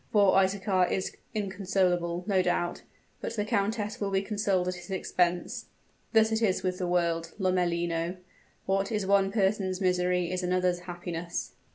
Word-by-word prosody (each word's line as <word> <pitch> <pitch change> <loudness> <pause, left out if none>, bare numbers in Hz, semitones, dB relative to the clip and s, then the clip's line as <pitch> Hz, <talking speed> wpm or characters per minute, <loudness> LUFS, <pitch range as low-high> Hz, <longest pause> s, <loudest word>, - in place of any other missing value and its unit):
"Poor 200 -3 +5
Isaachar 190 -1 +2
is 190 - -2 0.2
inconsolable, 185 -3 0
no 195 -2 +3
doubt; 175 -1 0 0.4
but - - -4
the 210 -2 -1
countess 210 0 -1
will 200 - 0
be 195 0 +1
consoled 200 -3 0
at 180 - 0
his 180 0 -10
expense. 180 -2 0 0.5
Thus 220 -1 +4
it 220 +1 +1
is 195 -5 +1
with 185 -1 -1
the 180 - -1
world, 170 -2 0
Lomellino; 175 -2 0 0.5
what 195 +3 0
is 210 -3 0
one 195 0 +3
person's 195 -2 +1
misery 180 -2 +1
is 185 0 -1
another's 180 0 +1
happiness." 175 -1 -4
185 Hz, 155 wpm, -29 LUFS, 180-200 Hz, 0.5 s, Poor